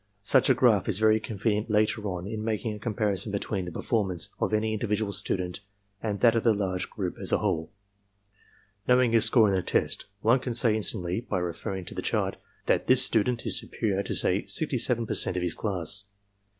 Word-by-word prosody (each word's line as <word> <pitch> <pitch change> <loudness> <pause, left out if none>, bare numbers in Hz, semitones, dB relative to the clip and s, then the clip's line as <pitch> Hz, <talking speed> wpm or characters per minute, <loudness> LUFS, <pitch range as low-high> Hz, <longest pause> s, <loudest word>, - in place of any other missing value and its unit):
Such 130 +6 +4
a 130 - +5
graph 120 -7 +3
is 100 - +2
very 110 0 +4
convenient 110 0 -2
later 105 +1 +1
on 90 -2 -4
in 110 +1 -5
making 110 0 -2
a 105 - -8
comparison 105 -2 -2
between 100 -1 -3
the 90 - -6
performance 95 -2 -2
of - - 0
any 110 0 0
in 110 - -2
dividual 105 -2 -1
student 90 -2 -2 0.4
and 105 -3 -3
that 115 -2 +6
of 115 - +1
the 115 -2 +3
large 95 -2 -2
group - - -4
as - - 0
a - - +4
whole. 80 +2 -2 1.2
Know 125 0 +5
ing 125 -2 +3
his 115 -1 +4
score 110 -1 +5
in 100 - +1
the 95 - +1
test, - - -1 0.2
one 120 +4 +4
can 125 -2 -4
say 115 -2 +2
instantly, 95 -2 0
by 100 - 0
reference 90 +1 -4
to - - -9
the - - -4
chart, - - -1 0.3
that - - +1
this 130 0 +6
student 115 +2 +1
is - - 0
superior 100 -4 -2
to - - -4
say 95 +3 +2
67% 120 - 0
of 90 - -1
his 85 -2 0
class. 100 -1 -2
105 Hz, 205 wpm, -27 LUFS, 95-115 Hz, 1.2 s, that